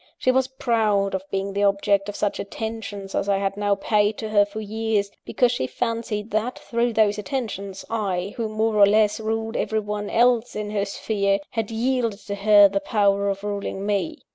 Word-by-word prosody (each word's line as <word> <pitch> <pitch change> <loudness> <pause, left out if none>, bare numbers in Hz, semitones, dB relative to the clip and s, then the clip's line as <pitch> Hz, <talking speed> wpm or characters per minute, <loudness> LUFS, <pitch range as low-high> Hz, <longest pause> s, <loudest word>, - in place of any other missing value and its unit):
She 255 - +2
was 260 0 +2
proud 220 -6 +1
of 190 - -1
being 195 0 -2
the 200 - -1
object 200 0 +2
of 205 - -6
such 205 - -1
attentions 205 -2 -6
as 200 - -1
I 200 - +3
had 195 0 -1
now 205 0 +1
paid 210 +1 +1
to 220 - -5
her 205 -1 +4
for 205 +2 -7
years, 215 -1 -1
because 245 -2 +2
she 245 - -1
fancied 230 - -3
that, 220 +4 -1
through 235 0 -1
those 210 -1 +2
attentions, 205 -6 -4
I, 200 -4 -2
who, 225 -2 -2
more 215 0 0
or 200 -1 +7
less, 210 +1 +3
ruled 225 +1 -2
everyone 210 -1 -2
else 240 0 +2
in 210 -1 -4
her 205 -1 0
sphere, 200 -1 0
had 225 -3 -2
yielded 230 -1 0
to 200 - -4
her 205 0 +6
the 195 0 -1
power 200 -1 +1
of 195 0 -3
ruling 200 -1 -3
_me. 205 +10 -1
210 Hz, 190 wpm, -23 LUFS, 200-225 Hz, -, or